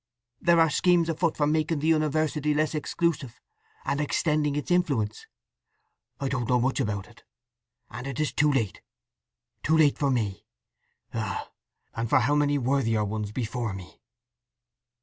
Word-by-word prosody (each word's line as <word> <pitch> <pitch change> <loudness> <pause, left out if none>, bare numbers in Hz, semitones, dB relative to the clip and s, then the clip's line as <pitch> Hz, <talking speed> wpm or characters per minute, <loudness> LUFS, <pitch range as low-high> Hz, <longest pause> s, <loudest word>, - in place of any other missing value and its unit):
There 170 -1 +4
are 165 -2 +4
schemes 170 +2 +3
afoot 165 0 0
for 150 - +2
making 155 +1 +1
the 145 - -3
university 155 -1 +1
less 155 +1 +1
exclusive, 150 -4 -2 0.5
and 140 - 0
extending 150 0 +1
its 150 +4 -3
influence. 140 -12 0 0.9
I 140 - -1
don't 125 -3 -2
know 125 -1 +4
much 130 +3 0
about 105 -6 -2
it. 120 - -19 0.7
And 125 +2 -6
it 135 0 -5
is 155 - 0
too 150 0 +3
late, 115 -8 -1 0.8
too 160 +1 +2
late 150 -3 +4
for 140 - +2
me! 105 -8 -2 0.7
Ah—and 110 +2 -6
for 135 0 +4
how 140 +5 +2
many 145 -1 +2
worthier 120 -5 +1
ones 105 0 -3
before 120 -1 -3
me!" 95 -2 -11
140 Hz, 150 wpm, -27 LUFS, 115-155 Hz, 0.9 s, There